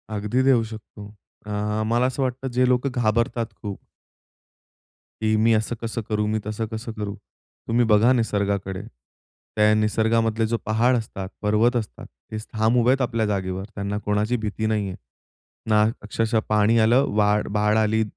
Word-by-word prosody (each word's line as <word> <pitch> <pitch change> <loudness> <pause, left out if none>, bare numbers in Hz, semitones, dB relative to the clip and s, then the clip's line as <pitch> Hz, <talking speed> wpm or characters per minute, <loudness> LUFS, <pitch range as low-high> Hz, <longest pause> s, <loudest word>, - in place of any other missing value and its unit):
अगदी 105 +5 0
देऊ 130 -4 +4
शकतो. 110 -2 -10 0.4
अ, - - -5 0.3
मला 120 +3 +2
असं 130 +2 -1
वाटतं 130 +1 -3
जे 125 0 +3
लोकं 125 +2 +1
घाबरतात 115 +1 +1 0.2
खूप 100 -2 -5 1.4
की 110 0 +2
मी 115 +1 +4
असं 110 +2 0
कसं 115 0 -3
करू, 105 -1 0
मी 110 +1 0
तसं 110 +1 -3
कसं 110 +1 -6
करू? 105 -2 -5 0.5
तुम्ही 120 +1 +2
बघा 110 +2 +4
निसर्गाकडे. 100 -5 -1 0.7
त्या 105 0 +4
निसर्गामधले 110 +1 +1
जो 115 +1 0
पहाड 115 +4 +2
असतात, 100 -4 -5
पर्वत 110 +4 +2
असतात 110 -4 -4 0.3
ते 110 - -4 0.2
ठाम 110 +2 +2
उभे 120 +1 +3
आहेत 135 +1 +1
आपल्या 115 -3 0
जागेवर 95 -2 -2
त्यांना 100 0 -3
कोणाची 105 +4 +1
भीती 110 0 -3
नाहीये. 105 -4 -1 0.7
ना 105 -1 +5 0.2
अक्षरशः 110 +2 0
पाणी 105 +2 +3
आलं, 120 +5 +4
वाड 105 0 +2
बाड 105 +1 +2
आली, 110 0 +2
110 Hz, 155 wpm, -23 LUFS, 105-115 Hz, 1.4 s, ना